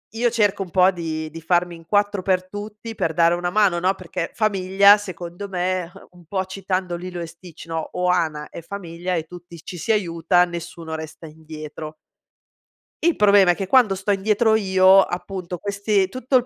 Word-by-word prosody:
io 240 +1 +2
cerco 210 -4 +1
un 180 - -12
po' 185 0 +5
di 160 -3 -4
di 165 +1 -10
farmi 175 +1 +1
in 165 -1 -15
4 205 +1 +1
per 185 -1 0
tutti 210 +3 -8
per 160 -4 -1
dare 170 0 +4
una 175 0 -1
mano 195 -3 +2
no, 185 +2 +1
perché 170 -2 -5
famiglia 200 -1 +4
secondo 185 0 -7
me 180 -1 -2 0.2
un 175 -1 -18
po' 190 +3 -2
citando 185 -2 -3
Lilo 180 0 -6
e 170 - -4
Sticht: 170 0 -13 0.3
"Ohana 170 -4 0
è - - -9
famiglia" 175 0 -5
e 160 - -1
tutti 175 0 -12
ci 180 - -8
si 225 - -1
aiuta, 175 -3 +2
nessuno 170 -2 -7
resta 160 +1 -8
indietro. 155 0 -9 1.1
Il 340 -1 +3
problema 200 -3 +6
è - - -1
che 195 0 -4
quando 245 -6 +4
sto 190 +2 -2
indietro 215 +3 +2
io, 190 -2 +5
appunto 180 -1 -4
questi 200 0 0
tutto 255 +2 +1
il 250 - 0
185 Hz, 180 wpm, -22 LUFS, 170-200 Hz, 1.1 s, problema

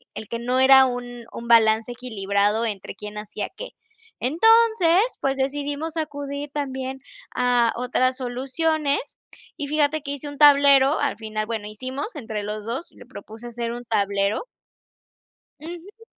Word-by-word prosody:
el 220 - -7
que 235 - -4
no 250 +2 -1
era 265 0 +7
un 245 -1 -5
un 235 - -8
balance 225 0 +4
equilibrado 210 -2 0
entre 200 -3 -5
quién 210 0 -8
hacía 210 0 -5
qué. - - -7 0.5
Entonces, 390 - +4 0.2
pues 270 0 0
decidimos 290 +4 -3
acudir 285 -1 -4
también 265 -2 -4 0.4
a 245 -2 +3
otras 255 +1 0
soluciones, 280 +4 0 0.6
y 285 - -4
fíjate 305 0 +1
que 280 - -4
hice 285 +1 -5
un 285 -1 -8
tablero 280 -1 +6
al - - 0
final, 215 -1 -4
bueno, 220 -2 -4
hicimos 260 - -6
entre 220 -5 -5
los 210 0 -5
2 255 +9 -5
y - - -23
le - - -13
propuse 225 +2 -11
hacer 235 0 -4
un 240 0 -7
tablero 200 - 0 1.1
Ujú. 350 +8 -11
255 Hz, 150 wpm, -23 LUFS, 225-290 Hz, 1.1 s, era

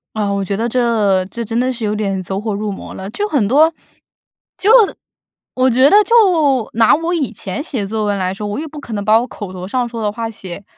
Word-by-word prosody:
啊， 210 -2 -1
我 200 - -1
觉 195 +1 -3
得 230 - -1
这 220 -6 +1
这 235 +4 -6
真 230 +2 -2
的 255 +1 +1
是 235 -3 -4
有 210 - 0
点 195 -3 -2
走 190 +2 -3
火 215 -1 -3
入 205 +1 -3
魔 - - -8
了， 190 +1 -7
就 415 - -2
很 265 - +1
多 310 +7 +4 0.9
就 415 +4 +3 0.8
我 255 0 +3
觉 260 +3 +5
得 410 - +6
就 440 - -2 0.6
拿 225 0 +4
我 330 +3 -2
以 295 -9 -1
前 205 +3 -5
写 245 -10 -3
作 215 0 -2
文 205 -1 0
来 185 0 -1
说， 210 +1 -5
我 205 +7 -3
也 320 - -5
不 305 0 -9
可 240 -5 -8
能 205 -1 -3
把 215 +2 +4
我 245 - -3
口 205 -6 -8
头 185 0 -7
上 245 +3 -1
说 230 -1 -6
的 210 -1 0
话 230 +1 -4
写 195 -3 -9
220 Hz, 260 characters per minute, -17 LUFS, 200-255 Hz, 0.9 s, 得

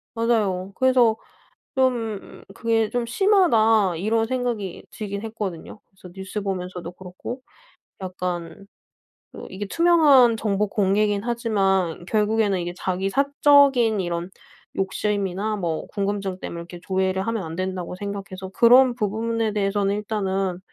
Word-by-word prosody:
맞아요. 205 -5 0
그래서 255 -4 +4 0.6
좀 235 -6 -1
그게 225 -2 +1
좀 245 -1 -1
심하다 230 - +3
이런 220 +5 +1
생각이 240 -7 -3
들긴 200 -1 -5
했거든요. 210 -4 -6
그래서 190 -2 -15
뉴스 190 +2 -5
보면서도 180 -3 -5
그렇고 185 +8 -8 0.6
약간 180 0 -5 0.7
그 - - -10
이게 195 +2 -5
투명한 290 -7 +5
정보 210 -1 0
공개긴 205 +1 +1
하지만 195 -8 0
결국에는 210 -2 +1
이게 175 0 -4
자기 190 +1 -2
사적인 275 -4 +4
이런 175 0 -3 0.5
욕심이나 200 +1 -1
뭐 165 -4 -3
궁금증 195 -2 -3
때문에 170 - -6
이렇게 175 +1 -10
조회를 190 0 -1
하면 225 -4 -2
안 160 0 -6
된다고 185 -1 -4
생각해서 195 -1 -6
그런 245 +4 +6
부분에 225 0 -1
대해서는 200 -1 0
일단은 195 -3 -2
205 Hz, 300 characters per minute, -23 LUFS, 190-230 Hz, 0.7 s, 그런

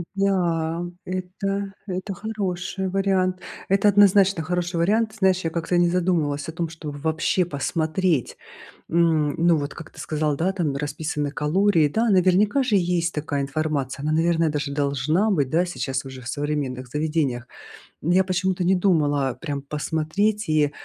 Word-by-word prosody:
Да, 175 -4 0 0.2
это 195 +2 -3
это 185 +2 -4
хороший 190 -2 -3
вариант. 190 -1 +1 0.3
Это 195 +2 +4
однозначно 195 -3 +5
хороший 175 +1 -2
вариант. 215 +6 +2
Знаешь, 190 -1 +3
я 165 - 0
как-то 170 +2 -1
не 175 0 +4
задумывалась 170 -5 0
о - - -3
том, 165 +1 -3
чтобы 155 -3 -7
вообще 160 +4 0
посмотреть. 160 0 -1 0.5
М, 160 -3 +2
ну 170 0 +4
вот 145 -1 -3
как 155 - -10
ты - - -18
сказал, 150 -2 -1
да, 180 +5 0
там 165 -8 -1
расписаны 145 0 -3
калории. 160 +2 +2
Да, 225 +10 0
наверняка 195 +7 +3
же 230 -5 +2
есть 175 -2 0
такая 145 -1 -2
информация. 140 -2 -2
Она, 155 +1 0
наверное, 165 0 +2
даже 145 -1 -3
должна 145 - +1
быть, 145 -9 +1
да, 170 +4 +2
сейчас 135 -6 -3
уже 130 -1 -9
в 125 - -9
современных 140 -3 -3
заведениях. 150 -4 -1 0.6
М, 170 - 0
я 190 +1 +5
почему-то 185 0 -1
не 185 +2 +3
думала, 150 -7 +2
а, - - -3
прям 140 0 -4
посмотреть 160 +9 -1
и, 150 -2 +3
165 Hz, 160 wpm, -23 LUFS, 150-185 Hz, 0.6 s, однозначно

